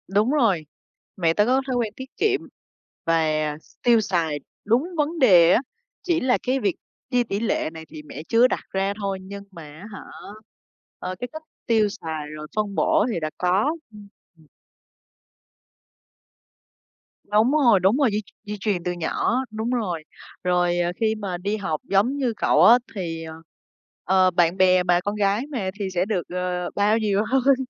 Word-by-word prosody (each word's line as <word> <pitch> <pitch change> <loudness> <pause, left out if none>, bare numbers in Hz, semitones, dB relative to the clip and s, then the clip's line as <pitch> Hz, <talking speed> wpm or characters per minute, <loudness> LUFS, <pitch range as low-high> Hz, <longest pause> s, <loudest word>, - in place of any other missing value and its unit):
đúng 215 +5 +3
rồi, 220 - +2 0.5
mẹ 165 -3 +2
tớ 210 +4 +3
có 260 +3 +3
thói 260 - -1
quen 230 -3 -1
tiết 260 0 -8
kiệm 405 -2 +1 0.6
và 165 0 +3 0.6
tiêu 235 -2 +5
xài 170 -7 -1 0.3
đúng 230 +6 +3
vấn 310 +2 -1
đề 180 - +7
á, - - +3 0.4
chỉ 345 -2 +1
là 255 -3 +2
cái 260 +1 0
việc 200 -7 0 0.4
chia 245 -1 +3
tỷ 200 -3 -3
lệ 220 -7 0
này 160 0 -9
thì 155 -1 -10
mẹ 150 0 -9
chưa 235 +2 +5
đặt - - -3
ra 195 +1 0
thôi, 195 -1 -2
nhưng 200 +1 -9
mà, 170 -4 -10
á 155 +7 -12
hả, - - -7 1.0
ờ, 185 0 -4
cái 245 - -3
cách 315 0 -8 0.2
tiêu 220 -2 +3
xài 160 -7 -6
rồi 150 0 -8
phân 210 -2 -1
bổ 320 0 +3
thì 175 - -2
đã 155 -1 -2
có. 195 - +1 0.2
Ưm, 210 -1 -13 0.3
ừm. 160 - -22 2.8
Đúng 215 +5 +2
rồi, 255 -9 +5
đúng 190 +7 +3
rồi, 280 -4 +3
di 210 +1 -1 0.2
di 210 0 -5
truyền 195 -4 -1
từ 180 - -1
nhỏ, 175 +8 -1
đúng 220 +2 -3
rồi. 195 -10 -2 0.4
Rồi, 175 -1 +1
ờ, 175 0 +1
khi 220 -1 +1
mà 195 -4 -4
đi 200 +4 -2
học 190 -7 -3
giống 215 +8 +2
như 255 -4 0
cậu - - +3
á, 240 +2 +9 0.2
thì, 165 -4 -4
ờ, 160 0 -8 0.7
ờ, 185 0 +3
bạn 175 0 +2
bè 185 -1 +4
mà, 175 -1 +3
con 205 +1 -2
gái 210 +5 +1
mà 215 -9 -2
thì 200 -2 -2
sẽ 180 +1 +1
được, 195 -4 -1
ờ, 180 0 -2
bao 205 +2 +3
nhiều 210 -2 +1
hơn, 270 +1 +4
200 Hz, 180 wpm, -23 LUFS, 180-235 Hz, 2.8 s, á